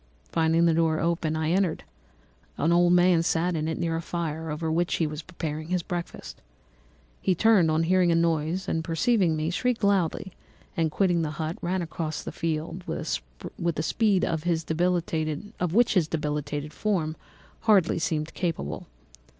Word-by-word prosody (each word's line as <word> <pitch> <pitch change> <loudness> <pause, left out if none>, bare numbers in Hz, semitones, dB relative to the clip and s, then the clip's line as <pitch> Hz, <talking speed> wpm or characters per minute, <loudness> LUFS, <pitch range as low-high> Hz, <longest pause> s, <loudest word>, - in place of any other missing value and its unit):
Finding 165 +1 +3
the 165 - +4
door 160 -1 +2
open, 165 -2 0
I 155 0 0
entered. 185 -3 +1 0.7
An 160 +4 +2
old 175 0 +4
man 180 -1 +5
sat 170 +1 +1
in 155 0 -1
it, 160 - -2
near 165 -1 -1
a 165 - -2
fire, 160 -2 -4
over 160 +1 -2
which 175 +2 +1
he 165 - +1
was 150 0 -4
preparing 155 -2 -5
his 180 -1 -1
breakfast. 170 - -6 0.8
He 185 - +2
turned 200 -4 +4
on 155 +1 +2
hearing 180 0 +3
a - - +3
noise, 165 +2 0
and 160 - -1
perceiving 170 +1 +2
me, 155 +2 -1
shrieked 245 +4 -1
loudly, 190 -2 +1 0.4
and 165 -1 +1
quitting 175 +1 +1
the 155 - -1
hut, 160 +1 -3
ran 180 +1 -1
across 155 -2 -4
the - - -5
fields 165 +2 -3
with - - -4
a 155 - 0
speed 205 +1 +2
of 160 -2 -1
which 170 +4 0
his 180 -6 +3 0.2
debilitated 150 0 -3
form 170 -7 -1 0.4
hardly 205 -6 +3
appeared 160 -1 -2
capable. 115 - -3
165 Hz, 160 wpm, -26 LUFS, 155-180 Hz, 0.8 s, man